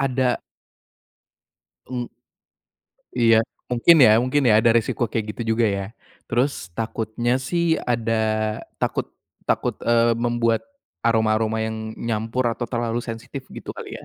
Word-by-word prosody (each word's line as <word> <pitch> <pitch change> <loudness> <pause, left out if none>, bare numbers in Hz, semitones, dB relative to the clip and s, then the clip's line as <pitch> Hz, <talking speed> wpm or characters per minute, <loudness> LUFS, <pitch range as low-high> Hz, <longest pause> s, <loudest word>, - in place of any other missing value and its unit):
ada 130 -2 +1 1.5
Mmm. 125 -1 -4 1.1
Iya. 115 -1 +6 0.4
Mungkin 125 +8 +6
ya 110 - +8
mungkin 130 +3 +1
ya, 110 - +6
ada 115 +1 +4
resiko 115 +1 +1
kayak 110 -2 -1
gitu, - - -5
juga, 115 0 +3
ya. 100 -1 -1 0.4
Terus, 120 -7 -1
takutnya, 115 +2 -1
sih, 170 +6 -1 0.3
ada 115 -1 -1 0.7
takut - - -1 0.4
takut, - - 0
eee, 115 0 +3
membuat, 115 -1 +1 0.4
aroma-aroma 110 -1 +2
yang 110 0 -5
nyampur 115 +2 -2
atau 120 -1 -5
terlalu 120 -1 -1
sensitif, 115 +4 -7
gitu, - - -7
kali, - - -7
ya. - - -13
115 Hz, 130 wpm, -23 LUFS, 110-120 Hz, 1.5 s, ya